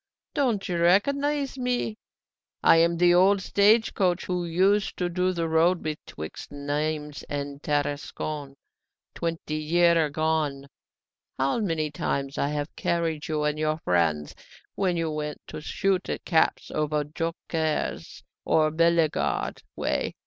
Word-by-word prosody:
Don't 235 -8 0
you 175 -2 -1
recognise 275 +10 +2
me? 250 -3 -1 0.7
I - - +7
am 170 +1 +3
the 175 0 +5
old 190 +3 +5
stage 210 +4 +3
coach 180 -3 +1
who 180 -1 -2
used 190 +5 +2
to 180 -1 -1
do 180 +1 +1
the 170 -2 -2
road 165 +2 +3
betwixt 150 - -6
Nimes 150 +1 -3
and 140 0 -4
Tarascon 145 -1 -3 0.6
twenty 165 -2 -3
year 165 +1 +3
agone. 150 -2 -1 0.7
How 135 - +1
many 165 -7 -1
times 140 -1 -2
I - - +1
have 145 +1 -3
carried 165 -3 -1
you 155 -1 -1
and 150 0 0
your 155 0 0
friends 85 - 0 0.4
when 185 -3 0
you 165 -1 -1
went 150 0 -4
to - - -7
shoot 190 +3 -1
at - - -4
caps 160 -3 +1
over 150 0 0
Joncquieres 160 0 -3 0.2
or 155 -1 +3
Bellegarde 160 - +1
way! - - -1
160 Hz, 135 wpm, -26 LUFS, 150-180 Hz, 0.7 s, I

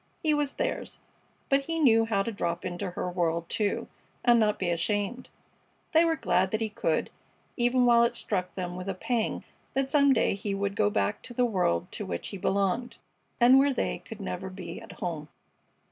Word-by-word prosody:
He 310 -1 +3
was 295 -2 0
theirs; - - -3 0.5
but 275 0 +2
he 330 +2 -2
knew 225 -7 +5
how 200 -3 +1
to 230 - -3
drop 170 -4 -3
into 185 +1 -3
her 180 - -4
world, 170 -2 -1
too, 205 -2 -1 0.4
and 240 -1 +6
not 210 -1 +2
be 180 -2 -1
ashamed. 205 +8 -1 0.6
They 325 +1 +6
were 325 -1 +2
glad 185 - +1
that 215 - -1
he 220 -1 -1
could, 165 -6 -1 0.4
even 245 0 +3
while 235 -1 +6
it 235 0 +1
struck 180 -5 -2
them 180 -2 -4
with 185 +2 -5
a 195 - -2
pang 230 +4 -1 0.3
that 270 0 0
some 280 -1 +5
day 245 - +3
he 200 0 -3
would 200 0 -2
go 210 -1 +3
back 205 0 0
to 240 - -9
the 250 - +3
world 180 - +1
to - - -5
which 85 -1 -4
he 200 - -6
belonged 200 +6 0 0.4
and 250 +3 +7
where 280 +1 +4
they - - -1
could 225 - -10
never 190 -1 -4
be 185 -1 -8
at - - -11
home. 160 -4 -5
205 Hz, 200 wpm, -28 LUFS, 185-245 Hz, 0.6 s, and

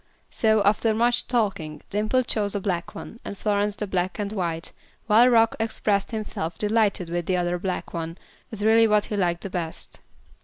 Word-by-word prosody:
So, 220 -2 +2
after 215 +2 +2
much 240 +2 +2
talking, 195 - -1
Dimple 215 +5 +1
chose 210 -3 -1
a - - 0
black 180 -3 -3
one, 230 - -9
and 200 - -7
Florence 205 0 0
the 210 - -3
black 185 -1 -2
and 205 -1 -3
white, 170 -4 -3 0.3
while 230 +3 +6
Rock 225 -2 +4
expressed 210 -3 0
himself 195 -7 -4
delighted 210 -4 +1
with 170 0 -3
the 185 - +1
other 175 0 0
black 185 0 -4
one 165 0 -4 0.3
as 210 -2 -5
really 225 +1 +5
what 210 -1 +3
he 210 - -4
liked 175 -3 0
the 195 - -5
best. 165 -3 -4
205 Hz, 185 wpm, -25 LUFS, 180-220 Hz, 0.3 s, while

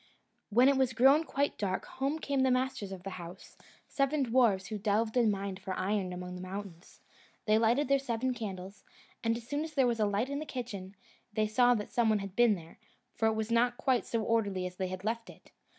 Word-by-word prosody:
When 240 +5 +5
it 275 -1 +4
was 260 -2 +2
grown 270 +7 +5
quite 285 -1 -1
dark, 190 -2 -1
home 275 +4 -2
came 280 -3 -2
the 260 - +3
masters 255 -5 -1
of 185 -2 -8
the 195 - -5
house, 175 +3 -11 0.3
seven 275 +1 +1
dwarfs, 230 -6 +3
who 215 +1 -5
delved 220 +2 0
and 235 -4 +4
mined 195 -1 -4
for 185 - -4
iron 195 -1 -1
among 180 0 -6
the 180 - -7
mountains. 185 -2 -8 0.4
They 215 0 +4
lighted 235 +6 +2
their 275 +1 +3
seven 255 -1 -1
candles, 195 -4 -7 0.4
and 230 0 +1
as 235 -1 -11
soon 290 +3 -1
as 315 -1 -8
there 270 -3 +4
was 235 -2 0
a 210 - +3
light 205 +7 -1
in 280 - -2
the 310 - -5
kitchen, 205 -7 -6 0.4
they 215 +1 +1
saw 245 +3 +4
that 210 -2 -4
some 235 -2 +3
one 215 - +3
had 195 -1 -6
been 240 -3 +5
there, 165 +1 -12 0.3
for 225 - +1
it 220 - +1
was 220 +1 -2
not 245 +1 +2
quite 255 -3 +1
so 230 -2 -1
orderly 205 -5 0
as 180 0 -6
they 190 - -1
had 185 +1 -6
left 230 +2 -2
it. - - -16
225 Hz, 230 wpm, -31 LUFS, 195-255 Hz, 0.4 s, When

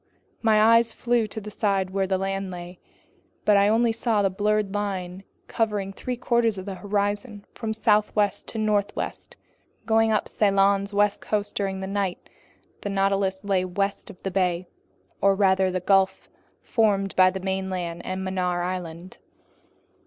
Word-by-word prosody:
My 220 -2 +4
eyes 230 +1 +5
flew 235 -2 +1
to 215 - -6
the 210 0 -9
side 195 -3 0
where 195 0 0
land 195 0 -1
lay, 180 0 -8 0.7
but 210 - +5
I 200 0 +5 0.2
saw 225 0 0
only 205 - +3
a - - +3
blurred 210 0 0
line 190 -3 -3 0.2
covering 210 -4 -1
three 250 +4 -4
quarters 235 -3 +1
of 185 - -6
the 200 - -4
horizon 205 +2 -2
from 225 -2 -4
southwest 210 -2 +1
to - - -7
northwest. 210 -2 -2 0.5
Going 225 0 +3
up 215 - +1
Ceylon's 200 -1 +2
west 205 0 +1
coast 205 -1 -2
during 195 -1 -2
the - - -3
night, 195 -2 -3 0.5
the 205 - -4
Nautilus 195 -1 0
lay 195 -2 +1
west 195 +2 -2
of 180 - -13
the 195 - -2
bay, 180 -2 0 0.6
or 195 0 +4
rather 190 -1 +3
that 185 -1 -3
gulf 195 -1 +2 0.4
formed 200 -4 +1
by 185 0 +6
the 190 +1 -5
mainland 185 -3 -3
and 185 0 -4
Mannar 180 -2 -1
Island. 180 -1 -6
195 Hz, 155 wpm, -25 LUFS, 190-210 Hz, 0.7 s, by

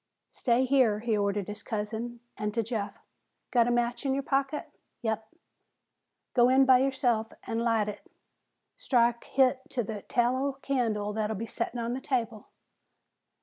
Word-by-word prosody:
"Stay 245 +1 +2
here," 250 -6 +3
he 230 -1 +1
ordered 200 -1 0
his 210 0 -6
cousin. 225 +2 -4
And 210 0 -3
to 230 - +1
Jeff, 215 -3 -3 0.5
"Got 240 -2 +4
a - - +2
match 240 +1 0
in 270 -1 +1
your 275 - -1
pocket?" 275 +2 -1 0.3
"Yep." 220 -1 -2 1.0
"Go 245 -1 +5
in 265 +1 +5
by 260 -1 +7
yourself 245 -4 +1
an' 225 - -2
light 230 -2 +2
hit. 210 0 -8 0.6
Strike 240 - +2
hit 260 -1 +3
to 245 - -1
the 210 -1 -5
tallow 255 +5 +1
candle 220 -6 0
that'll 215 0 -1
be 220 +3 -4
settin' 230 +1 -3
on 235 +1 -2
the 260 - -4
table." 230 -6 -2
235 Hz, 155 wpm, -29 LUFS, 220-255 Hz, 1.0 s, by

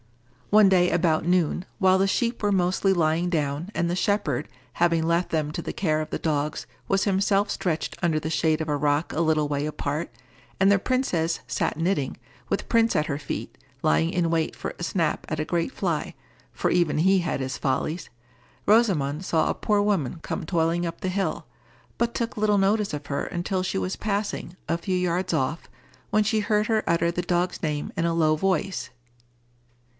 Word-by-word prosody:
One 210 -1 +7
day 180 -2 +4
about 165 -2 +1
noon, 175 -1 +1
while 190 -2 +4
the 195 - +3
sheep 235 +4 0
were 205 - +2
mostly 185 +1 +2
lying 170 0 +2
down, 150 +1 -1
and 170 - 0
the 175 - 0
shepherd, 185 -9 0 0.2
having 170 -1 +2
left 170 +2 +1
them 155 -2 -1
to 170 - -4
the - - -4
care 155 -5 0
of 155 - -5
the - - -2
dogs, 150 -1 -1 0.2
was 195 0 +2
himself 200 +1 +2
stretched 170 -3 -2
under 160 -3 +2
the 155 +1 -4
shade 155 +1 +2
of 160 - -3
a 150 - 0
rock 145 +2 0
a 165 - 0
little 155 -2 +2
way 145 0 -1
apart, 150 +1 -3 0.5
and 195 0 +5
the 200 -1 +5
princess 180 -10 0
sat - - -1
knitting, 165 -5 0 0.3
with - - -1
Prince 230 -1 +3
at 150 - +2
her 145 -2 -3
feet, 140 - -5 0.3
lying 75 +2 +3
in 170 -2 0
wait 165 -1 0
for - - -5
a - - -6
snap 170 -3 0
at 155 - -2
a 155 - -1
great 170 +8 -1
fly, 170 - -2 0.4
for 120 - -1
even 175 -4 +2
he 190 +4 +4
had 170 -5 -2
his 130 -1 -3
follies—Rosamond 150 - -1
saw 160 -4 +1
a - - +1
poor 210 -1 +1
woman 180 -9 0
come 185 - -4
toiling 170 0 +1
up 170 0 -5
the 185 - -2
hill, 195 +1 -2 0.5
but 235 0 +1
took 235 -1 -2
little 210 -1 +2
notice 200 +1 +2
of 145 -1 -5
her 140 - -2
until 185 +1 -2
she 185 - -2
was 95 0 -2
passing, 200 -3 -3
a 165 +1 0
few 185 +1 -1
yards 180 +1 0
off, 155 +2 -1 0.4
when 215 0 +3
she 220 +1 +1
heard 210 0 +1
her 220 -1 +1
utter 170 0 +2
the 175 - -2
dog's 175 0 -1
name 150 -3 -2
in 165 - 0
a 170 0 +1
low 155 -2 +3
voice. 185 -6 -1
170 Hz, 195 wpm, -25 LUFS, 155-195 Hz, 0.5 s, One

